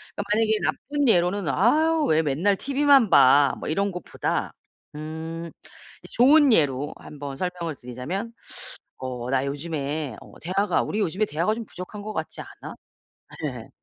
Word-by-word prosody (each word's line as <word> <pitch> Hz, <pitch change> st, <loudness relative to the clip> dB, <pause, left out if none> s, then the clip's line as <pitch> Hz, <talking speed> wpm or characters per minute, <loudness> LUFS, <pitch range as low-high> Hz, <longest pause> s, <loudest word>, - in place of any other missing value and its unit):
그니까 205 Hz, -, -3 dB
만약에 220 Hz, 0 st, +2 dB
나쁜 285 Hz, 0 st, -1 dB
예로는 180 Hz, -2 st, +2 dB
"아우 305 Hz, -, +3 dB
왜 160 Hz, 0 st, +3 dB
맨날 160 Hz, +8 st, +1 dB
티비만 275 Hz, -3 st, +4 dB
봐." 140 Hz, -1 st, +6 dB
뭐 -, -, -6 dB
이런 200 Hz, +5 st, 0 dB
것보다 180 Hz, -1 st, -3 dB, 0.4 s
음 160 Hz, +2 st, -6 dB, 0.5 s
이제 -, -, -13 dB
좋은 280 Hz, +2 st, +6 dB
예로 145 Hz, -5 st, +1 dB
한번 145 Hz, -2 st, -8 dB
설명을 180 Hz, -3 st, -3 dB
드리자면 130 Hz, -, -5 dB, 0.7 s
"어 125 Hz, -1 st, -5 dB
나 135 Hz, 0 st, +1 dB
요즘에 145 Hz, -2 st, -3 dB
어 -, -, -15 dB
대화가 195 Hz, +4 st, +1 dB
우리 210 Hz, -, -3 dB
요즘에 195 Hz, +1 st, 0 dB
대화가 170 Hz, +4 st, 0 dB
좀 230 Hz, 0 st, -6 dB
부족한 185 Hz, +3 st, -8 dB
것 215 Hz, +1 st, -5 dB
같지 -, -, -4 dB
않아?" -, -, -10 dB, 0.7 s
예. -, -, -5 dB
175 Hz, 300 characters per minute, -25 LUFS, 145-215 Hz, 0.7 s, 봐